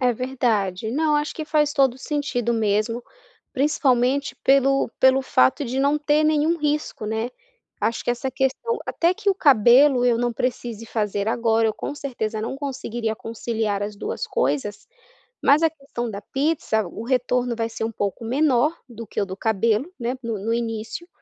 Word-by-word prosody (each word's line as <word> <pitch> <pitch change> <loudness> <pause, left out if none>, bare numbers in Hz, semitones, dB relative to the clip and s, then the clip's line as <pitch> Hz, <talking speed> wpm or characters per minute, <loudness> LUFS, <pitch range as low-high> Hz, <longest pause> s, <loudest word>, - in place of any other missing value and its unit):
É 250 -1 +3
verdade. 220 -5 -1
Não, 300 +3 +1
acho 295 +1 -2
que 315 - -5
faz 300 -1 +1
todo 270 -4 +3
o 260 - -15
sentido 255 -5 -1
mesmo, 220 +2 0 0.5
principalmente 275 -1 +1
pelo 275 0 +3
pelo 265 0 +5
fato 130 - +2
de 260 +1 -3
não 285 +2 +2
ter 300 +1 +2
nenhum 310 +2 +2
risco, 300 -6 -2
né. 220 +2 -2 0.5
Acho 230 - -1
que - - +1
essa 250 +2 -2
questão 270 - -1
até 340 +2 +2
que 415 +1 -3
o 390 - +4
cabelo 255 - +5
eu 245 -2 +3
não 240 0 0
precise 230 -2 -3
fazer 210 -3 -2
agora, 225 -1 +2
eu 215 - 0
com 285 - -5
certeza 235 -7 -4
não 230 +5 -4
conseguiria 240 -5 -3
conciliar 220 -3 -3
as 205 0 -4
2 - - -4
coisas, 145 +10 -1 0.6
mas 290 +3 +5
a 325 - +4
questão 275 -6 -6
da 200 -1 -5
pizza, 270 - 0
o 215 - -8
retorno 250 -1 0
vai 225 0 -2
ser 225 - -5
um 225 - -1
pouco 205 +1 -3
menor 275 +4 +2
do 230 -1 -8
que - - -2
o - - 0
do 190 0 -7
cabelo, 220 - +1
né, 240 +2 -2
no 225 -2 -2
no 230 - 0
início, 230 +7 -4
245 Hz, 180 wpm, -23 LUFS, 225-280 Hz, 0.6 s, pelo